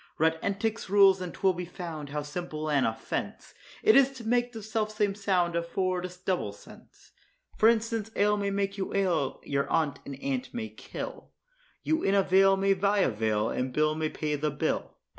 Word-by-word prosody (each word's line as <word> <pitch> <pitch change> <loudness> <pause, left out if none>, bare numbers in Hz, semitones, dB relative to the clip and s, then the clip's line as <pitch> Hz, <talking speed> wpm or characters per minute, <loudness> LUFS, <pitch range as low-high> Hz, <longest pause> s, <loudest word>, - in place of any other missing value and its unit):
Read 160 +1 +2
Entick's 210 +2 -2
rules, 195 -1 +6
and 180 -1 -4
'twill 190 +2 +1
be 180 0 -5
found, 165 -4 -7
how 150 +1 -3
simple 155 0 -4
an 140 -4 +3
offence 110 0 -4 0.3
It 220 - +6
is 275 -1 +6
to 255 -3 -10
make 245 +1 +2
the 225 -3 -8
self 215 0 -1
same 210 -2 0
sound 185 -4 0
afford 180 +2 -1
a - - -13
double 180 - -1
sense. - - -17 0.4
For 220 - +5
instance, 225 -1 0
ale 210 +1 +3
may 200 -1 -1
make 200 0 -2
you 190 - -3
ail, 180 -8 0
your 140 0 -1
aunt 155 -3 +1
an 140 - -5
ant 260 - -4
may 225 -2 -3
kill, - - -8 0.5
You 315 +1 +1
in 195 - +2
a 195 - +4
vale 195 +1 +5
may 195 0 +3
buy 200 +1 +2
a 135 - +2
veil 110 0 0
and 130 +1 -2
Bill 155 +3 +2
may 155 0 -1
pay 150 -1 -3
the 150 +1 -1
bill. 145 - -2
190 Hz, 200 wpm, -28 LUFS, 155-210 Hz, 0.5 s, rules